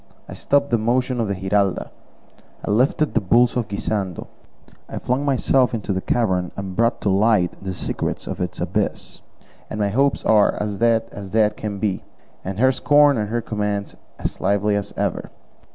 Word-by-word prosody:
I - - -8
stopped 140 0 +1
the 120 - +3
motion 125 +3 0
of 115 - 0
the 100 - -1
Giralda, 95 0 0 0.7
I - - -1
lifted 130 +7 +2
the - - +2
bulls 120 +5 +3
of 120 -4 -1
Guisando, 100 -2 -3 0.6
I - - -6
flung 125 +3 -1
myself 130 -2 +2
into 105 -2 -3
the 95 - -2
cavern 95 -7 0
and 95 -2 -5
brought 115 +2 +1
to - - 0
light 100 -2 +2
the 95 - -3
secrets 90 - -3
of - - -5
its - - -3
abyss; - - -2 0.5
and 105 - -5
my 100 -1 +1
hopes 135 +6 +1
are 105 -2 +4
as 105 -1 -3
dead 115 -1 +3
as 100 -1 -8
dead 105 0 +2
can 105 -2 -5
be, 100 -1 -2 0.4
and 95 +1 -5
her 130 +4 +4
scorn 145 +2 +4
and 105 -3 -2
her 120 +1 -1
commands 105 -2 -3 0.2
as - - -4
lively 100 +2 +1
as 100 0 -2
ever. - - -2
105 Hz, 185 wpm, -21 LUFS, 100-120 Hz, 0.7 s, are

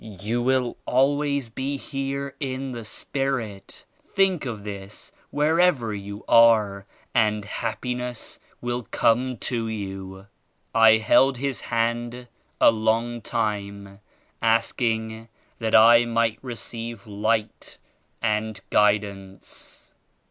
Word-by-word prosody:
You 110 +3 -3
will 125 -1 +1
al 135 +3 +3
ways 140 -3 -1
be 135 +5 -3
here 135 0 -4
in 135 -2 -3
the 120 -2 -6
spirit. 115 -4 -4 0.2
Think 190 -7 +2
of 110 -4 -5
this 100 -1 -7 0.2
wher 155 +3 +2
ever 140 -12 +3
you 100 +1 -7
are 105 -4 +5 0.3
and 105 -3 +2
happiness 125 +2 -4 0.2
will 120 0 -2
come 125 +2 +2
to 115 0 -2
you." 95 -3 -6 0.5
I 115 -1 +7
held 130 +4 +4
his 135 +1 -2
hand 120 +1 -2 0.3
a - - +7
long 115 +2 0
time, 100 -3 -3 0.4
asking 115 0 0 0.3
that 110 -1 +1
I 115 +2 +8
might 115 -1 0
receive 115 -3 -6
Light 110 +1 -2 0.5
and 110 -1 -1
Guidance. 100 -2 -1
115 Hz, 110 wpm, -24 LUFS, 105-125 Hz, 0.5 s, I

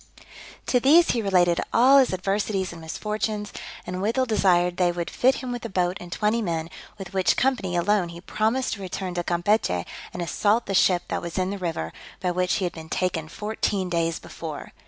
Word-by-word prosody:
To 250 - +3
these 315 +7 +6
he 235 - 0
related 180 -4 +3
all 265 +4 +6
his 260 - +3
adversities 195 0 -1
and 170 -1 -10
misfortunes, 210 +5 -3 0.3
and 180 +1 -4
withal 230 +6 +1
desired 180 -6 +2
they 180 -1 +3
would 175 -1 -4
fit 260 +2 +3
him 255 -2 -5
with 245 -1 -5
a 230 - -4
boat 180 -1 0
and 175 0 -10
twenty 215 +4 +1
men, 165 -4 -2 0.3
with 195 -2 -8
which 190 -1 +2
company 245 -9 +1
alone 180 +1 +2
he 170 0 -9
promised 220 +8 0
to 200 - -7
return 185 0 -4
to 175 0 -2
Campechy, 175 - +1 0.3
and 175 - -4
assault 205 +7 +1
the 195 - -3
ship 180 -2 +4
that - - -2
was 170 +1 -6
in 185 +1 0
the 200 - -4
river, 165 - -3 0.3
by 180 -1 0
which 180 +1 +1
he - - -1
had 175 - -3
been 160 -1 -10
taken 170 -4 -1
fourteen 205 0 -2
days 165 -1 0
before. 155 -3 -8
185 Hz, 200 wpm, -25 LUFS, 175-215 Hz, 0.3 s, these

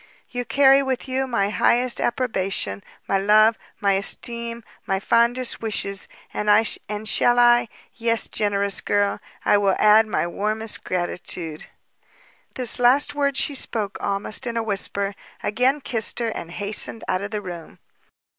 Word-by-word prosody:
you, 245 -1 -3
carry 275 +1 +5
with 265 -1 -3
you 265 +1 -1
my 205 -5 0
highest 240 +5 +2
approbation, 195 - -1 0.3
my 195 - +1
love, 215 +3 +5 0.2
my 200 -1 +2
esteem, 235 +4 -3 0.2
my 195 -1 0
fondest 235 +4 +1
wishes! 200 -3 -3 0.3
and 210 - -2 0.6
shall 240 +2 +2
I 240 0 +5 0.3
yes, 230 -1 0
generous 200 -2 0
girl! 205 0 0 0.3
I 205 - +4
will 195 -2 +2
add 215 +1 +5
my 210 - -1
warmest 215 +5 -2
gratitude!" 175 -3 -4 0.9
This 250 -1 +2
last 270 +4 +4
word 280 -2 0
she 290 - +1
spoke 215 -6 -3
almost 200 +5 -3
in 235 0 -3
a 230 - 0
whisper, 200 -1 -1 0.3
again 255 +6 +1
kissed 225 -4 0
her, 235 -1 0
and 170 -6 -6
hastened 205 +4 -2
out 185 0 0
of 200 - -4
the 210 -1 -4
room. 175 -3 -9
220 Hz, 145 wpm, -22 LUFS, 200-240 Hz, 0.9 s, carry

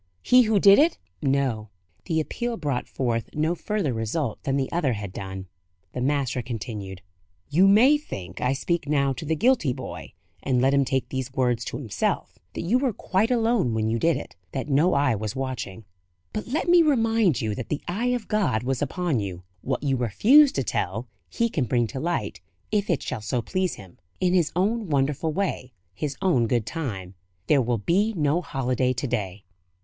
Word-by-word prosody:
he 250 0 +6
who 220 -3 +3
did 200 +3 +7
it?" 325 +3 +3 0.2
No; 135 -7 0 0.4
the 160 - 0
appeal 235 +9 -3
brought 145 -6 -2
forth 115 -3 -2
no 155 +3 +1
further 175 - -2
result 115 +3 -2
than 135 0 -1
the 135 -1 -1
other 150 -7 +1
had 100 -3 -6
done. 95 -1 -6 0.5
The 125 - -3
master 135 -2 0
continued: 105 -5 -6 0.5
"You 180 +6 +5
may 250 +9 +6
think 90 - -8
I 125 +1 +2
speak 170 +4 -2
now 140 -2 +2
to 155 - -7
the 160 +2 0
guilty 225 - +2
boy, - - -8 0.3
and 125 -2 +1
let 135 +2 +3
him 140 -1 +3
take 130 0 -1
these 130 -1 -4
words 125 -3 +1
to - - -4
himself 115 -8 -2 0.2
that - - -3
you 220 +9 +2
were 260 -4 0
quite 195 +4 0
alone 230 - +1
when 110 0 0
you 115 - 0
did 165 +4 +2
it; - - -9 0.2
that 130 - -3
no 150 +6 +3
eye 140 -3 +3
was 105 -1 -4
watching. 125 -6 -5 0.5
But 215 - -4
let 280 +8 -1
me 345 0 +7
remind 225 - +3
you 110 -2 -1
that - - -6
the 150 - -3
eye 205 +8 -1
of 235 -4 -5
God 190 - +1
was 130 0 -1
upon 150 -1 -1
you. 95 -3 -5 0.2
What - - -2
you 135 -2 +1
refuse 230 - +5
to - - -1
tell, - - -2 0.2
He 235 - 0
can 155 - -1
bring 120 +1 +1
to 115 +4 -6
light, 170 +4 -2 0.3
if 205 -1 0
it 165 -7 +1
shall 110 - -4
so 120 +3 -2
please 185 +3 -1
Him, 95 -4 -14 0.2
in 180 -1 +2
His 175 -4 +2
own 210 +2 0
wonderful 145 +2 0
way, 150 -8 -2 0.2
His 135 +7 -4
own 130 -12 +3
good 120 -2 0
time. 110 - -5 0.3
There 145 -3 +4
will 120 -1 0
be 200 - +1
no 150 +2 +2
holiday 130 -4 0
to 130 +3 -3
day. 100 -5 -3
140 Hz, 195 wpm, -25 LUFS, 120-185 Hz, 0.5 s, did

